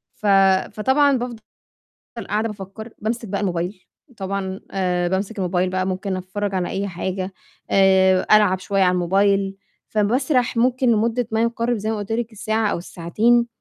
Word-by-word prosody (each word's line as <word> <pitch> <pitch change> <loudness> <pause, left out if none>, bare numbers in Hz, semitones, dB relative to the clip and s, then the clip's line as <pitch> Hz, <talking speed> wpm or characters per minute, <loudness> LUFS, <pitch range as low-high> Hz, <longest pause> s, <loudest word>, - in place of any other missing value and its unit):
ف 215 - -11 0.5
فطبعًا 265 +5 +3
بافضل 240 -1 -4 0.9
قاعدة 215 +2 0
بافكّر، 210 +2 -8
بامسك 225 +1 -3
بقى 200 +1 -2
الموبايل، 180 0 -3 0.3
طبعًا 190 -1 -3
آآ، 180 -2 0
بامسك 195 +4 -2
الموبايل 180 -1 0
بقى 185 0 -1
ممكن 190 +1 -2
أتفرّج 190 +2 -4
على 180 -1 -1
أي 200 +1 -2
حاجة، 185 +1 -4 0.4
آآ، 190 -1 +4
ألعب 205 -3 +5
شوية 195 +1 +1
على 180 - +4
الموبايل، 195 +2 +2 0.4
فباسرح 245 +4 +1
ممكن 250 +1 +3
لمدة 230 +2 +1
ما 220 0 +1
يقارِب 235 0 0
زي 215 +2 -2
ما 220 - -2
قلت 205 +1 -6
لِك 230 0 -2
الساعة 220 +1 -1
أو - - -1
الساعتين، 220 +8 +1
200 Hz, 155 wpm, -21 LUFS, 190-225 Hz, 0.9 s, ألعب